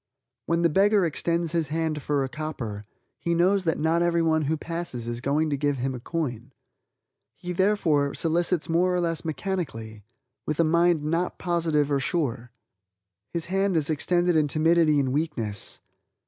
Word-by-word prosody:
When 170 +1 +1
the 170 - +4
beggar 200 +3 +3
extends 170 +1 -1
his 165 -2 0
hand 155 0 -2
for 145 -1 0
a - - -2
copper, 130 -9 -5 0.3
he 170 0 -1
knows 185 +3 +2
that 160 - +1
not 160 +2 +1
everyone 165 -2 +2
who 160 +3 0
passes 165 -8 -5
is 120 0 -4
going 150 +4 0
to - - +1
give 145 0 0
him 130 +1 -2
a 125 - -6
coin. 130 -3 -4 0.8
He, 180 - -6
therefore, 170 -7 +2
solicits 170 +1 0
more 180 +2 +2
or - - +1
less 165 -2 -1
mechanically, 135 - -4 0.4
with 155 - -3
a - - +6
mind 170 0 +3
not 165 +4 -1
positive 160 -4 0
or 140 - +2
sure. 130 -5 -2 0.8
His 170 -2 -3
hand 195 0 +1
is 155 0 +1
extended 175 +3 +1
in 155 -2 +3
timidity 155 0 +3
and 130 -2 0
weakness. 125 -10 -2
160 Hz, 165 wpm, -26 LUFS, 145-170 Hz, 0.8 s, a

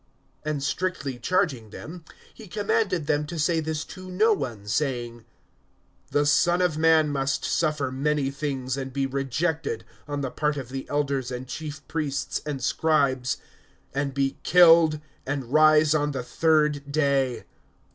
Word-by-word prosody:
(21)And 150 -2 -1
strictly 145 -5 -2
charging 135 - 0
them, 165 - -9 0.3
he 220 - -12
commanded 200 -3 0
them 150 0 +1
to 170 - -6
say 165 +2 +2
this 155 -1 -3
to 185 0 -10
no 215 +5 +3
one; 125 - -4
(22)saying: 120 0 -2 0.8
The 145 0 +2
Son 175 +4 +3
of 180 -4 +2
man 160 -1 +4
must 135 -1 -1
suffer 150 -5 0
many 140 +1 0
things, 135 -2 -3
and 135 -1 -4
be 135 +1 -1
rejected 140 0 -2 0.2
on 145 -1 -3
the 135 -2 -3
part 150 -1 -1
of 130 -3 -6
the 135 0 -6
elders 140 -3 -1
and 125 0 -6
chief 150 -1 -7
priests 150 -3 -2
and 140 -4 -3
scribes, 140 -6 +1 0.6
and 140 +1 -1
be 135 -1 0
killed, 165 -3 +6 0.3
and 135 -2 -3
rise 155 0 +6
on 145 -1 +1
the 130 -2 -3
third 150 0 +1
day. 140 -4 +1
145 Hz, 150 wpm, -25 LUFS, 135-160 Hz, 0.8 s, killed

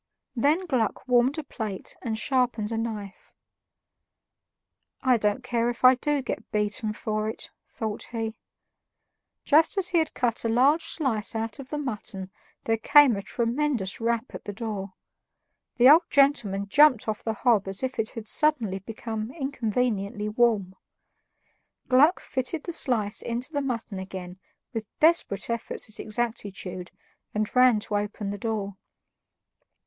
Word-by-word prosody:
Then 295 +9 +2
Gluck 255 - -1
warmed 250 +3 +3
a 315 - -3
plate 215 -8 -5
and 225 -3 -3
sharpened 240 -3 0
a 225 - -1
knife. 210 -4 -6 1.7
"I 255 -3 +4
don't 210 +3 0
care 240 -1 0
if 240 +1 -2
I 255 - +9
do 285 +2 -1
get - - -5
beaten 210 +1 -1
for 215 0 -2
it," 220 - -7 0.2
thought 215 -2 -5
he. 225 -2 -3 1.1
Just 315 +6 +4
as 370 -2 +3
he 345 - +3
had 315 -1 -1
cut 235 -2 0
a 230 - 0
large 270 +8 +4
slice 255 -10 0
out 225 +3 -3
of 270 -1 -9
the 300 - -3
mutton 210 -8 -5 0.3
there 225 0 +1
came 280 +1 +6
a 200 - -4
tremendous 235 -2 -1
rap 230 +1 -1
at - - -9
the 205 - -5
door. 200 -3 -5 0.8
The 245 +1 +6
old 320 +5 +8
gentleman 235 -9 +2
jumped 265 0 +5
off 215 -1 -2
the 225 - -2
hob 220 -3 +2
as 195 +5 -3
if 260 0 -3
it 220 0 0
had 225 -2 -7
suddenly 235 -12 +1
become 220 +2 -5
inconveniently 235 -7 -2
warm. 215 -4 +1 1.2
Gluck 290 +8 +5
fitted 260 +4 -3
the 345 - 0
slice 225 -9 +2
into 240 +6 -3
the 285 - 0
mutton 230 -7 -4
again, 185 -1 -8 0.3
with 220 -2 -4
desperate 310 -11 +2
efforts 235 -1 -3
at - - -12
exactitude, 200 -5 -4 0.5
and 215 +2 -2
ran 250 -3 +6
to 210 -1 -2
open 205 0 -3
the 205 - -6
door. 200 -3 -3
230 Hz, 150 wpm, -26 LUFS, 210-260 Hz, 1.7 s, I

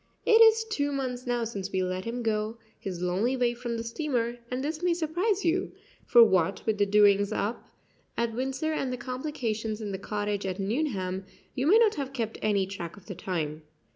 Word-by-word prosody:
It 445 0 +6
is 450 0 +7
two 285 -10 -1
months 255 -3 -3
now 240 -1 0
since 200 -4 -4
we 185 0 0
let 185 +1 -3
him 240 +1 -3
go 215 0 -1 0.2
his 180 -2 -5
lonely 200 +9 +1
way 245 -1 +2
from 240 -1 -4
the 230 - -3
steamer; 240 -2 -2
and 255 +1 -2
this 305 +2 -3
may 355 -1 +2
surprise 355 +5 0
you, 360 +3 +1 0.3
for 240 -1 +8
what 190 -3 +2
with 215 -2 0
the 205 - +3
doings 205 0 +5
up 215 +2 -3 0.5
at 235 -1 0
Windsor 270 +6 -2
and 270 -4 -1
the 250 - -3
complications 240 -4 -3
in 210 -2 -4
the 190 - -4
cottage 205 0 -2
at 185 -1 -3
Nuneham, 195 -5 -1 0.3
you 265 +2 -1
may 405 +7 +7
not 455 -2 +5
have 270 0 -5
kept 225 -4 -3
any 200 -3 +2
track 185 -3 -7
of 195 - -15
the 200 - -6
time. 160 -4 -3
230 Hz, 200 wpm, -28 LUFS, 200-270 Hz, 0.5 s, for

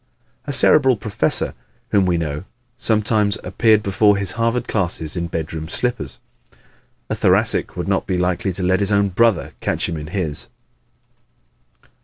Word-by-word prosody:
A - - -2
Cerebral 135 -2 +4
professor 105 0 +1 0.4
whom 100 -3 +3
we 90 -1 +1
know 75 +1 -4 0.3
sometimes 110 -3 +1
appeared 105 +3 +2
before 100 +1 +3
his 100 -2 -2
Harvard 115 +2 -1
classes 85 -6 -2
in 85 -1 -2
bedroom 80 -1 -5
slippers. 85 - -2 0.9
A - - +2
Thoracic - - +2
would - - -3
not - - 0
be 95 -2 0
likely 90 +1 0
to 90 - -5
let 95 +1 +2
his 100 0 0
own 100 -1 +3
brother 115 +2 +2
catch - - -1
him 85 - -4
in 75 0 -7
his! 85 -5 -4
95 Hz, 150 wpm, -20 LUFS, 85-110 Hz, 0.9 s, Cerebral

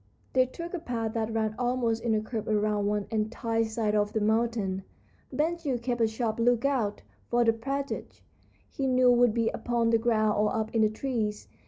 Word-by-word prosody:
They 255 0 +4
took 335 +7 -7
a 360 - -2
path 230 -7 -3
that 225 -1 -1
ran 220 -1 0
almost 240 -2 0
in 230 -2 +2
a 215 - +1
curve 220 0 -5
around 210 -1 +1
one 205 -1 0
entire 225 +1 0
side 220 -1 -1
of 210 0 +1
the 220 - +1
mountain. 215 -3 0 0.5
Ben 325 +3 0
Gile 285 -7 -2
kept 240 0 -2
a 225 - +5
sharp 220 0 -2
lookout, 240 -2 +1 0.2
for 240 0 +2
the 225 - +4
partridge, 275 +4 -4 0.4
he 270 -2 -3
knew, 255 -1 +5
would 240 -2 +4
be 230 -1 +2
upon 235 -1 0
the 230 - +4
ground 215 -2 +2
or 210 +3 +2
up 220 0 -2
in 225 - +2
the 215 - +4
trees. 215 -2 -3
230 Hz, 195 wpm, -28 LUFS, 215-245 Hz, 0.5 s, a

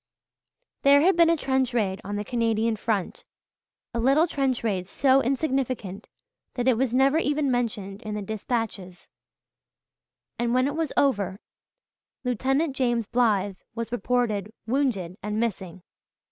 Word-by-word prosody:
There 280 +1 +6
had 365 +4 +4
been 335 -1 +5
a 335 - +3
trench 265 -3 0
raid 195 -4 0
on 205 +1 -4
the 205 - -2
Canadian 230 -1 0
front 210 -3 -2 0.7
a 235 - -2
little 275 +7 +4
trench 270 -7 -1
raid 190 -5 -1
so 270 +5 +3
insignificant 260 - -2 0.5
that 245 0 -1
it 260 - +6
was 255 +1 0
never 270 +5 +3
even 290 -3 0
mentioned 215 -5 -2
in 215 -1 -5
the 210 - -4
dispatches 215 -3 -4 1.3
and 240 0 +1
when 255 0 +3
it 285 +2 -2
was 320 -3 -1
over 200 -8 +1 0.8
Lieutenant 270 +4 0
James 240 -4 +1
Blythe 205 -5 +1 0.2
was 230 0 -4
reported 225 -3 -1
"wounded 220 -8 -1
and 210 +1 -3
missing." 190 -6 -3
235 Hz, 140 wpm, -25 LUFS, 205-265 Hz, 1.3 s, There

